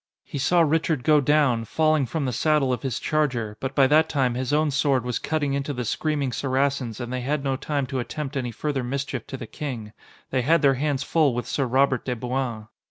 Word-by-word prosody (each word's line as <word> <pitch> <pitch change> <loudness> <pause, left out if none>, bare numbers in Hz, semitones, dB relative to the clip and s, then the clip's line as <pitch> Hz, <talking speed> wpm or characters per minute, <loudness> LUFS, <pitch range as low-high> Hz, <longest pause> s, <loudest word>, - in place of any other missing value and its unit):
He 140 - -6
saw 170 +6 +3
Richard 160 -3 +1
go 150 +2 +5
down, 140 -5 +3
falling 155 +1 +2
from 155 +2 -2
the 125 - -1
saddle 145 0 +2
of 125 - -3
his 130 -4 -2
charger, 130 -9 -1
but 130 0 -4
by 135 - +6
that 155 +3 +4
time 130 -5 +1
his 130 +2 -2
own 150 0 +2
sword 135 -3 +1
was 125 -1 -1
cutting 150 -3 -1
into 140 +1 -2
the 125 -2 -3
screaming 145 +1 -1
Saracens 135 -3 -1
and 120 0 -5
they 130 - -2
had 140 +3 -1
no 135 -1 0
time 140 +1 -2
to 130 0 -3
attempt 145 +3 -5
any 125 -3 -1
further 135 +3 -2
mischief 130 -1 -3
to 135 - -6
the - - -7
King. 115 -8 -6 0.4
They 130 - +1
had 155 +5 +3
their 135 -1 +6
hands 140 0 -1
full 150 -4 +2
with 120 - -2
Sir 135 -3 -1
Robert 130 0 +2
de 125 - -2
Bouain. 120 -2 -3
135 Hz, 225 wpm, -24 LUFS, 125-150 Hz, 0.4 s, by